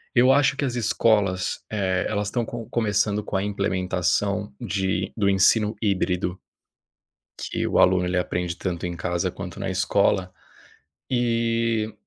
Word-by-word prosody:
Eu 125 +2 +6
acho 140 0 +4
que 145 - -3
as 130 -3 -1
escolas, 105 -5 +1
eh, 95 -3 0
elas 105 -1 -1
estão 120 +1 -1
co 115 -1 -7
começando 105 -2 +1
com 105 - -5
a 95 - +1
implementação 100 +1 -1
de 95 -4 -1
do 100 -2 +2
ensino 105 +2 +3
híbrido 95 -2 0 1.1
que - - -1
o - - +1
aluno 90 0 +4
ele 90 0 0
aprende 90 -1 -2
tanto 90 -2 -3
em 90 0 -3
casa 85 0 -1
quanto - - -8
na - - -2
escola, 95 -1 +1 0.8
eh 115 -2 0
100 Hz, 145 wpm, -24 LUFS, 95-115 Hz, 1.1 s, Eu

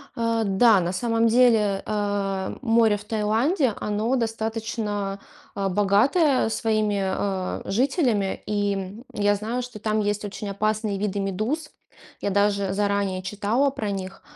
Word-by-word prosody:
Э, 230 -1 0
да, 200 +2 +5
на 175 0 -1
самом 230 +3 +1
деле, 220 -4 +3
э, 200 -2 -2
море 225 -3 +3
в 205 - -12
Таиланде, 225 - +1
оно 215 +5 0
достаточно, 220 -3 -2 0.4
а, 195 -1 0
богатое 225 - +3
своими, 215 -2 0
э, 190 0 -2
жителями, 235 - +1
и, 205 -1 0
м, 195 +5 -6
я 205 0 +2
знаю, 225 +5 -3
что 240 -3 -9
там 215 +1 0
есть 205 0 -1
очень 205 0 -6
опасные 215 +1 -1
виды 205 0 -1
медуз. 215 - -2 0.5
Я - - 0
даже 200 -1 +1
заранее 200 -2 0
читала 210 +8 +1
про 220 -6 -4
них, 190 -1 -6
210 Hz, 140 wpm, -24 LUFS, 200-230 Hz, 0.5 s, да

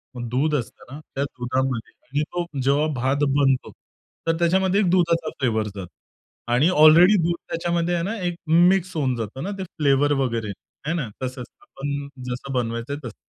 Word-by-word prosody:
मग 120 -1 -5
दूध 150 +5 +1
असतं 125 0 -6
ना 150 - -7 0.2
त्या 140 - 0
दुधामध्ये 130 -2 -2 0.2
आणि 145 +3 -1
तो 175 -1 -1 0.2
जेव्हा 140 +4 +2
भात 135 +4 0
बनतो, 135 -2 +2 0.6
तर 165 0 +2
त्याच्यामध्ये 190 +3 +2
एक 180 - +2
दुधाचा 170 -3 +2
फ्लेवर 110 -5 0
जातो 95 -3 -7 0.7
आणि 145 +8 +4
ऑलरेडी 170 +4 +7
दूध 170 0 +1
त्याच्यामध्ये 170 +1 -1
आहे 170 - -1
ना 215 +5 -2
एक 175 - -2
मिक्स 175 +2 +4
होऊन 130 -5 0
जातं 115 +5 -5
ना 200 - -3
ते 190 - -4
फ्लेवर 145 -4 +2
वगैरे 115 -4 -1 0.4
आहे 160 - 0
ना 145 -9 -2 0.2
तसंच. 130 -1 -4 0.2
आपण 140 0 -5 0.2
जसं 125 +2 -5
बनवायचं 115 +1 -2
आहे 145 - -4
तसं. 110 - -11
145 Hz, 175 wpm, -23 LUFS, 125-170 Hz, 0.7 s, ऑलरेडी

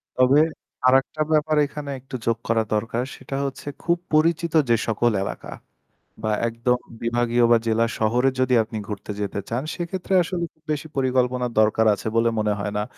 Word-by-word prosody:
তবে 130 +3 +5 0.5
আরেকটা 135 +4 +3
ব্যাপার 155 0 +2
এখানে 145 0 -7
একটু 130 +1 -9
যোগ 115 -1 +1
করা 115 -1 +2
দরকার 115 +3 -1
সেটা 135 +1 -7
হচ্ছে 140 +1 -6 0.2
খুব 170 0 +2 0.2
পরিচিত 165 +1 +2 0.2
যে 115 - +5
সকল 115 +2 +2
এলাকা - - -6 0.7
বা 110 - 0 0.2
একদম 115 +2 0 0.2
বিভাগীয় 120 0 +2
বা 120 - +7
জেলা 115 +1 +3
শহরে 120 +4 +3
যদি 130 0 +2
আপনি 110 0 -7
ঘুরতে 105 0 -6
যেতে 100 0 -2
চান 120 +3 -2
সেক্ষেত্রে 180 +2 -4
আসলে 175 0 -3
খুব 155 - -38
বেশি 150 +1 -3
পরিকল্পনার 125 -2 +1
দরকার 110 +1 +3
আছে 100 - -5
বলে 115 0 +3
মনে 105 -1 +1
হয় 100 0 -3
না। 105 - 0
125 Hz, 170 wpm, -23 LUFS, 115-145 Hz, 0.7 s, বা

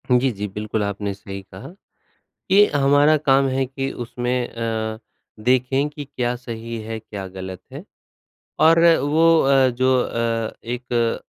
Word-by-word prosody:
जी, 125 +1 +3
जी। 105 -1 -5
बिल्कुल 105 +2 -3
आपने 100 0 -3
सही 100 0 -8
कहा, 95 0 -12 0.8
कि 200 +2 +6
हमारा 145 +2 +4
काम 135 -2 +3
है 135 0 0
कि 135 +1 -4
उसमें 120 +1 -3
अ, 110 -1 -3 0.4
देखें 130 +4 +2
कि 145 0 -8
क्या 125 -3 -2
सही 115 -1 -7
है 110 +1 -5
क्या 105 -3 -8
गलत 95 -1 -8
है? - - -8 0.7
और 165 +1 +5 0.2
वो 160 +4 +4
अ, 135 -1 +4
जो 130 +2 +1
अ, 115 -1 -2
एक 120 -1 -2
120 Hz, 145 wpm, -21 LUFS, 110-135 Hz, 0.8 s, कि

